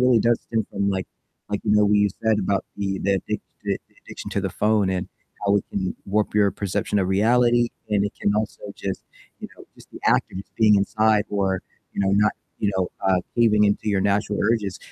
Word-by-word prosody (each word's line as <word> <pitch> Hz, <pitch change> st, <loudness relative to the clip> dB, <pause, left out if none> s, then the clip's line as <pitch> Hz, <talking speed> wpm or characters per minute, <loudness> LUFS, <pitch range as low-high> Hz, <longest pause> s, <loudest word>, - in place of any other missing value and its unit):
really 125 Hz, -2 st, +5 dB
does 115 Hz, +1 st, +2 dB
stem 110 Hz, -2 st, -2 dB
from, 100 Hz, 0 st, 0 dB
like 95 Hz, -1 st, -2 dB, 0.4 s
like, 105 Hz, -, -1 dB
you 105 Hz, -, +2 dB
know, 105 Hz, 0 st, +5 dB
what 105 Hz, -, +3 dB
you 105 Hz, 0 st, +4 dB, 0.2 s
said 110 Hz, -1 st, +3 dB
about 100 Hz, 0 st, 0 dB
the 95 Hz, -1 st, -2 dB
the 100 Hz, -, 0 dB
addict 95 Hz, -, -3 dB, 0.2 s
the -, -, -1 dB, 0.3 s
addiction -, -, -8 dB
to -, -, -1 dB
the -, -, -2 dB
phone 105 Hz, -2 st, +2 dB
and 90 Hz, -1 st, -2 dB, 0.4 s
how 100 Hz, +1 st, +4 dB
it -, -, -1 dB
can 95 Hz, -2 st, -2 dB
warp 105 Hz, +1 st, 0 dB
your 100 Hz, -1 st, +4 dB
perception 100 Hz, +1 st, -2 dB
of 95 Hz, -, +1 dB
reality, 120 Hz, +4 st, +3 dB, 0.2 s
and 100 Hz, -1 st, +2 dB
it 100 Hz, -, -2 dB
can 100 Hz, -, +1 dB
also 105 Hz, 0 st, -2 dB
just 95 Hz, -1 st, -5 dB, 0.4 s
you -, -, -7 dB
know, -, -, -13 dB
just -, -, -18 dB
the -, -, -10 dB
act -, -, +3 dB
of 95 Hz, -, -6 dB
just 95 Hz, -, -11 dB
being 110 Hz, -2 st, +5 dB
inside 110 Hz, +1 st, +2 dB
or, 95 Hz, -2 st, 0 dB, 0.3 s
you -, -, -3 dB
know, 95 Hz, -1 st, +2 dB
not, 105 Hz, +1 st, +3 dB, 0.3 s
you 100 Hz, -, +1 dB
know 95 Hz, -1 st, 0 dB, 0.2 s
uh, 95 Hz, -1 st, +3 dB, 0.2 s
caving 110 Hz, -3 st, +4 dB
into 105 Hz, +1 st, +1 dB
your 100 Hz, -2 st, +2 dB
natural 100 Hz, +1 st, 0 dB
urges, 105 Hz, -4 st, 0 dB
105 Hz, 220 wpm, -23 LUFS, 100-110 Hz, 0.4 s, really